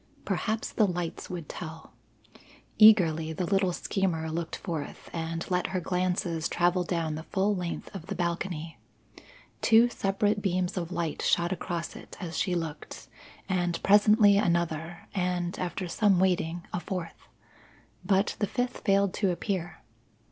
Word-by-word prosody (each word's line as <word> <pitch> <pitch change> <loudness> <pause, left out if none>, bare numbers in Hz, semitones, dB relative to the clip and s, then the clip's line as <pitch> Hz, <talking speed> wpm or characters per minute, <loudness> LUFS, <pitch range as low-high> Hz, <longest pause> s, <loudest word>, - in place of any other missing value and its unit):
Perhaps 220 0 -1
the 215 - +3
lights 175 -2 -4
would 175 -4 -5
tell. 160 -1 -8 0.9
Eagerly 165 -7 +6
the 175 +3 -2
little 195 0 +2
schemer 170 -3 -1
looked 165 +1 -3
forth, 165 -6 -6
and 165 0 -3
let 180 -1 +1
her 185 - -2
glances 180 -2 -1
travel 175 +1 +2
down 165 -3 -1
the 155 - -4
full 200 +1 +1
length 175 -2 -5
of 185 -3 -8
the 200 - -4
balcony. 170 -2 -3 0.8
Two 230 +2 +6
separate 205 -1 0
beams 185 -1 0
of 175 -2 -3
light 170 -3 -2
shot 170 +1 +2
across 175 -2 -3
it - - -11
as 170 -4 -5
she 180 -2 0
looked, 160 -3 -6 0.4
and 175 -3 0
presently 205 0 +6
another, 170 -3 -1
and, 180 -2 -1
after 180 +1 -3
some 195 +1 +3
waiting, 175 -2 +1
a 175 - 0
fourth. 175 -2 -6 0.8
But 195 0 +2
the 205 - +1
fifth 245 +4 -2
failed 200 -1 +2
to 195 - +1
appear. 180 -1 -3
180 Hz, 145 wpm, -28 LUFS, 170-195 Hz, 0.9 s, Eagerly